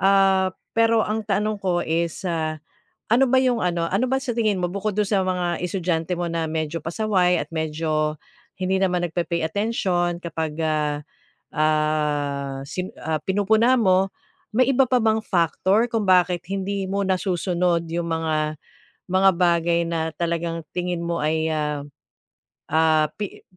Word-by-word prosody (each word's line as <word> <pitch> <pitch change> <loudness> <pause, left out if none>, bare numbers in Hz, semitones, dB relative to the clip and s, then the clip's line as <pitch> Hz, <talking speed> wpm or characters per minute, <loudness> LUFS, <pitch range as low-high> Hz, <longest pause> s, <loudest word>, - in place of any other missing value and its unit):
ah, 195 -1 +4 0.3
pero 230 -1 +4
ang 220 +1 -1
tanong 210 +1 0
ko 180 -2 +1
is, 165 +3 -1
ah, 155 -2 -2 0.5
ano 255 +3 +5
ba 260 0 +4
'yong 245 -2 +2
ano, 170 -1 0
ano 210 +7 +2
ba 265 0 +1
sa 250 - -2
tingin 215 -3 +2
mo 175 - +1
bukod 200 +1 -2
do'n 210 -2 +2
sa 200 - +2
mga 180 -2 -1
estudyante 175 -1 -1
mo 175 0 -2
na 165 -1 -1
medyo 160 0 -2
pasaway 180 0 +1
at - - -8
medyo 155 -1 -1 0.4
hindi 185 +1 +1
naman 180 -2 +1
nagpe-pay 170 0 -2
attention 175 -3 0
kapag, 160 -2 -3
ah, 150 -1 0 0.5
ah, 150 -3 0
si, 185 +5 -4
ah, 160 -1 -1
pinupuna 220 +6 +3
mo, 190 -2 +3 0.4
may 255 +3 +3
iba 270 +1 +5
pa 255 - +4
bang 220 0 +2
factor 190 +5 +2
kung 225 -2 +1
bakit 180 -1 +4
hindi 195 0 -2
mo 200 0 0
nasusunod 180 -2 0
'yong 170 0 -2
mga 155 -2 -1 0.6
mga 190 +1 +5
bagay 170 -1 +2
na 160 -1 -1
talagang 170 -1 -2
tingin 180 -1 -2
mo 170 0 -1
ay, 160 +1 +1
ah, 150 -2 -2 0.9
ah, 155 -1 +3
pi 205 -2 -6
175 Hz, 155 wpm, -23 LUFS, 160-195 Hz, 0.9 s, ano